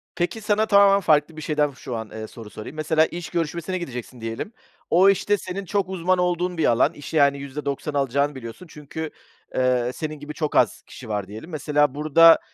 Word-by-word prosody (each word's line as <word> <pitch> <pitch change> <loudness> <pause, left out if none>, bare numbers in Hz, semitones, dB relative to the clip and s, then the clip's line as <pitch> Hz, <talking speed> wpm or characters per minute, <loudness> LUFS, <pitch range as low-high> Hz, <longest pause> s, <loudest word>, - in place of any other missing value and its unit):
Peki, 180 +6 -2
sana 210 0 +2
tamamen 200 -1 +6
farklı 155 -2 +2
bir - - -6
şeyden 150 -1 +1
şu 130 -2 -7
an, 110 -1 -5
eee, 110 0 -6
soru 115 -2 -11
sorayım. 110 +7 -9
Mesela 155 +1 +3
iş 175 +1 -6
görüşmesine 170 +2 -2
gideceksin 125 -7 -7
diyelim. 115 - -4 0.4
O 185 +3 +6
iş 195 0 +1
de 205 - +5
senin 195 +1 -6
çok 195 0 -1
uzman 185 0 +1
olduğun 180 0 0
bir 160 - +2
alan, 115 +1 +3
işi 145 +2 -5
yani 140 -1 +4
%90 140 +1 -4
alacağını 140 +1 +1
biliyorsun 125 +7 -9
çünkü, 155 +1 -6 0.5
eee, 125 -1 +2
senin 155 0 -5
gibi 145 +1 -7
çok 150 0 -3
az - - +3
kişi 120 -3 -12
var 105 -2 -2
diyelim. 110 - -9
Mesela, 150 -3 +1
burada 155 +3 +6
150 Hz, 195 wpm, -23 LUFS, 130-175 Hz, 0.5 s, tamamen